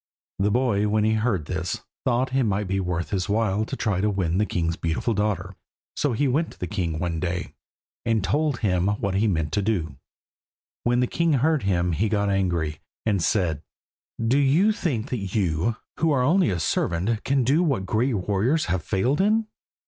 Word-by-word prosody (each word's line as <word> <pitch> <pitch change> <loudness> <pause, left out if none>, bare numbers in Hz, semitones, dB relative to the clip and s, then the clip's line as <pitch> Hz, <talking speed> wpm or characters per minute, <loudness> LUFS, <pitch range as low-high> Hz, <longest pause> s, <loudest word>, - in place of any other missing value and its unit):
The 100 +2 +2
boy 105 -3 +2
when 105 0 +2
he 110 +1 +3
heard 110 -4 +1
of - - -13
this 90 +1 -3 0.2
thought 130 +1 +1
that 130 - 0
it - - +3
might 100 -1 0
be 95 +1 0
well 90 -2 -3
worth 85 - -4
his 95 -2 -1
while 105 0 +1
to - - -5
try 100 -5 0
to 105 - +2
win 95 -3 0
the 105 - +1
king's 85 -5 -1
beautiful 85 +9 -1
daughter. 105 -2 -1 0.4
So 145 -4 0
he 140 +5 +1
went 150 +6 0
to - - -23
the - - -2
king 90 -5 -2
one 85 0 -2
day, 90 0 -3 0.5
and 115 -3 +1
told 145 +3 0
him 90 -4 +1
what 100 -1 -1
he 100 +4 +2
meant 80 -6 0
to 100 - +1
do. 90 -10 -1 0.9
When 120 +1 +2
the - - +3
king 165 +5 +1
heard 150 +2 +2
him, 90 -2 +1
he 100 +7 0
got 100 -1 +1
angry, 85 -6 0 0.3
and 100 -4 +1
said 80 -3 +1 0.6
"Do 115 +5 +2
you 155 +10 +4
think 140 - -2
that 100 -6 -3
you, 95 +2 +1 0.2
who 165 - +2
are 130 -3 +2
only 175 - +3
a 90 -3 -1
servant, 90 +7 0
can 135 -1 +2
do 140 +8 +3
what 135 - 0
great 115 +6 +1
warriors 105 - +1
have 95 -1 -1
failed 120 - +1
in?" 215 +3 +2
105 Hz, 205 wpm, -24 LUFS, 90-125 Hz, 0.9 s, you